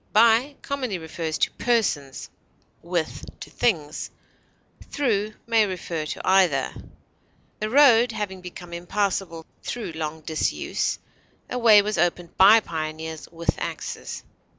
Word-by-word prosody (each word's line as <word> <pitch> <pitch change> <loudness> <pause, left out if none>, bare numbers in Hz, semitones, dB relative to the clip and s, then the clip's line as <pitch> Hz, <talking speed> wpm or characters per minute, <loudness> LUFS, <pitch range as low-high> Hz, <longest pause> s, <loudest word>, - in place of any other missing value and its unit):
By 230 +6 +5
commonly 255 -8 -2
refers 160 -1 -4
to - - +1
persons; 175 - 0 0.5
with, 170 -1 -3 0.2
to - - -9
things; 160 -10 -1 0.8
through 215 -6 0
may 225 -2 +3
refer 170 -4 -4
to - - -6
either. 185 -8 +3 0.9
The 215 - -2
road 245 -3 +6
having 195 -4 -4
become 180 -1 -10
impassable 175 -1 -2 0.2
through 235 -7 -5
long 160 0 -5
disuse, 155 0 -1 0.5
a 250 - -1
way 215 -3 +7
was 210 -4 -2
opened 175 0 0
by 210 +4 +7
pioneers 160 -2 -5
with 170 0 -1
axes. - - -5
185 Hz, 120 wpm, -24 LUFS, 160-220 Hz, 0.9 s, way